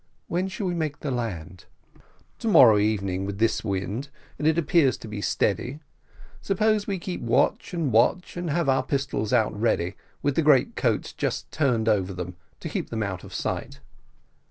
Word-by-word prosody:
"When 180 +2 -1
shall 190 +1 -4
we 180 - 0
make 155 -4 -3
the 145 - -2
land?" 90 -8 -4 0.7
"To - - -4
morrow 115 - +7
evening 100 -3 0
with 100 0 -4
this 115 +2 +1
wind, 105 +6 -3 0.3
and 150 - +1
it 160 +1 +3
appears 160 -5 +3
to - - -10
be 105 -1 -5
steady. 125 +8 0 0.6
Suppose 210 +1 +1
we 195 -2 -1
keep 180 0 -5
watch 120 0 +1
and 165 -7 -1
watch, 120 +11 +2
and 175 -1 -3
have 165 +1 0
our 135 -1 +3
pistols 135 -7 -2
out 115 -4 +3
ready, 100 -4 0 0.3
with 145 -1 +1
the - - +3
greatcoats 145 -4 +2
just - - -3
turned 125 -7 +1
over 100 -3 +2
them, 90 0 -6 0.3
to - - -4
keep - - -3
them 110 -1 -2
out 95 -3 -4
of - - -11
sight?" - - -4
125 Hz, 180 wpm, -25 LUFS, 105-160 Hz, 0.7 s, morrow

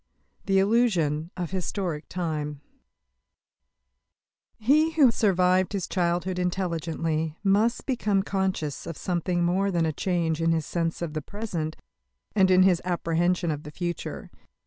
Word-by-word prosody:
THE 195 -1 +3
ILLUSION 190 -8 +2
OF 175 -2 -3
HISTORIC 180 -4 -3
TIME 150 -5 -3 2.0
He 300 +8 +3
who 305 -4 +5
has 235 - +4
survived 185 -2 +3
his 195 -3 -2
childhood 180 0 0
intelligently 165 -3 -2
must 210 +4 +2
become 210 -7 +1
conscious 190 -7 -2
of 165 - -5
something 175 0 -1
more 190 +3 +1
than 170 -3 +1
a 160 - -1
change 165 -1 -1
in 165 0 +3
his 160 -2 -1
sense 165 0 -2
of 160 -3 -4
the 155 - -2
present 170 -4 -4 0.6
and 190 -2 +5
in 185 0 +6
his 180 -2 +4
apprehension 175 0 0
of 150 -1 -4
the 150 - -9
future. 175 +2 -5
180 Hz, 140 wpm, -26 LUFS, 165-195 Hz, 2.0 s, in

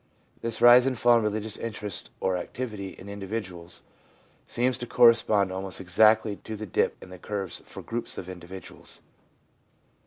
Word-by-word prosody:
This 115 -1 -3
rise 120 +1 +8
and 130 -2 0
fall 120 0 +5
in 115 - +1
religious 105 0 -1
interest 105 -3 -5
or 95 -1 0
activity 100 +1 -5
in 95 - -12
individuals 95 -4 -6 0.6
seems 125 0 +1
to 120 - -4
correspond 110 -5 +5
almost 95 0 -2
exactly 105 +3 +3
to 110 - -7
the 110 +1 -6
dip 95 - 0
in - - -12
the 90 - -10
curves 100 0 -3
for - - -9
groups 120 +1 -3
of 90 - -6
individuals. 90 0 -9
105 Hz, 155 wpm, -27 LUFS, 95-115 Hz, 0.6 s, rise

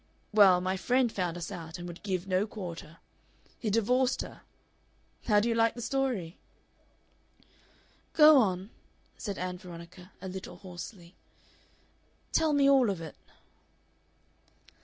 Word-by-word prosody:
Well, 195 -4 +7
my 185 +1 -1
friend 250 +4 +2
found 180 -4 -2
us 170 - -5
out, 165 -1 -7
and 175 0 -7
would 175 0 -9
give 185 -3 -2
no 190 +2 +1
quarter. 170 -6 -8 0.6
He 220 - -2
divorced 245 +5 +2
her. - - -11 0.9
How 210 -3 +5
do 215 - 0
you 235 - +2
like 230 0 +2
the 240 - -6
story?" 245 -12 -2 1.7
"Go 305 -2 +8
on," 190 -2 0 0.5
said 200 -4 -4
Ann 180 0 -4
Veronica, 180 +1 -11
a 190 - -7
little 190 +1 -7
hoarsely, 180 -1 -10 1.2
"tell 320 -1 +3
me 285 -1 +4
all 270 -5 +5
of 195 -4 -2
it." 160 -2 -8
190 Hz, 135 wpm, -30 LUFS, 180-230 Hz, 1.7 s, Go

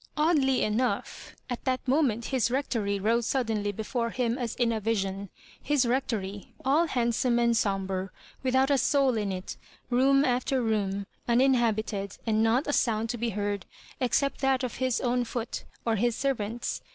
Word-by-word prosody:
Oddly 300 -4 +3
enough, 230 +4 -2
at 245 -2 -5
that 260 0 -1
moment 250 -5 +2
his 250 -3 +2
Rec 270 +3 -1
tory 200 -4 0
rose 225 +4 +1
suddenly 220 -6 0
before 230 +3 -2
him 235 -1 -1
as 245 -4 -3
in 240 -2 +1
a 225 - -1
vision 200 -3 -2 0.2
— - - -24
his 280 -4 +4
Rectory, 220 -6 -2
all 305 +6 +3
handsome 240 -2 +1
and 235 -1 +3
sombre, 195 -3 -1 0.3
without 265 +1 +2
a 275 - +4
soul 275 -2 +3
in 205 -3 -1
it, 185 0 -5 0.3
room 275 +3 +4
after 255 +1 +1
room^ 200 -3 -1 0.2
uninhabited, 230 -5 +1
and 220 -1 +2
not 230 +5 +3
a 290 - -1
sound 225 -3 +1
to 240 - -5
be 235 +1 0
heard, 205 -2 -3 0.3
except 275 +3 0
that 270 -1 +2
of 250 - -3
his 255 -1 0
own 245 0 +1
foot 235 0 -4 0.2
or 225 -1 +1
his 235 +2 +1
servant's. 235 -4 -2
235 Hz, 170 wpm, -28 LUFS, 215-260 Hz, 0.3 s, his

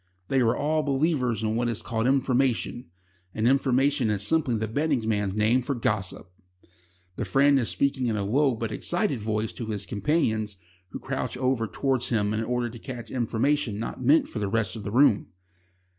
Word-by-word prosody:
They 135 -1 +2
are 115 -1 +2
all 155 +2 +1
believers 135 -5 0
in 110 0 0
what 120 +1 0
is 115 - -3
called 115 0 -1
information, 130 -4 +1 0.5
and 110 +1 +1
information 135 -1 +2
is 105 -1 -1
simply 155 -5 +1
the 110 +1 -2
betting 140 -1 0
man's 105 -3 0
name 110 +4 +3
for 140 +3 -2
gossip. 105 -7 -2 0.9
The - - -2
friend 140 0 +4
is 120 - -1
speaking 135 -2 0
in 110 -2 0
a 100 - -1
low 135 +4 +2
but 115 0 -3
excited 175 - -1
voice 110 0 -2
to 115 - -6
his 105 -2 -4
companions, 110 - 0 0.3
who - - -6
crouch - - -4
over 130 -3 0
towards 130 +1 -1
him 105 -3 +1
in 110 +1 -1
order 120 0 -1
to 120 - -10
catch 120 -3 -7
information 120 0 0
not 115 +3 -5
meant 145 +6 +4
for 115 - -5
the 100 -2 -1
rest 105 -3 0
of 110 - -7
the 100 - -4
room. 125 -3 +4
120 Hz, 190 wpm, -26 LUFS, 110-135 Hz, 0.9 s, friend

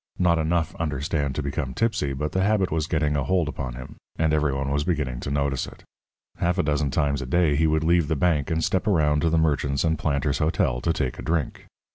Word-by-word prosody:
Not 85 -2 +3
enough, 80 +1 0
understand, 75 -2 -2
to 75 - -2
become 70 -2 -3
tipsy, 110 -11 0
but 75 +3 -3
the 95 - 0
habit 100 -1 +2
was 80 -1 -1
getting 75 -3 0
a 70 - 0
hold 90 -2 +1
upon 65 -4 -5
him, 65 +1 -10 0.2
and 80 -1 +1
every 75 -2 +2
one 70 +1 -2
was 70 +1 +1
beginning 75 -8 -1
to - - -5
notice 70 -1 -1
it. - - -13 0.5
Half 90 +2 0
a 90 - +2
dozen 75 -1 0
times 70 +1 0
a 65 - -5
day 80 +1 +2
he 80 +2 +3
would 80 0 +1
leave 85 -1 +3
the 80 - 0
bank 75 -2 +1
and 80 -1 0
step 95 +1 0
around 75 -7 +3
to 80 - +2
the 80 - +2
Merchants 70 -3 +1
and 80 -2 +1
Planters' 70 -1 0
Hotel 65 -6 +1
to 85 - +1
take 65 -6 -2
a - - -4
drink. 80 -4 -2
Mr. - - -31
75 Hz, 240 wpm, -24 LUFS, 70-80 Hz, 0.5 s, Not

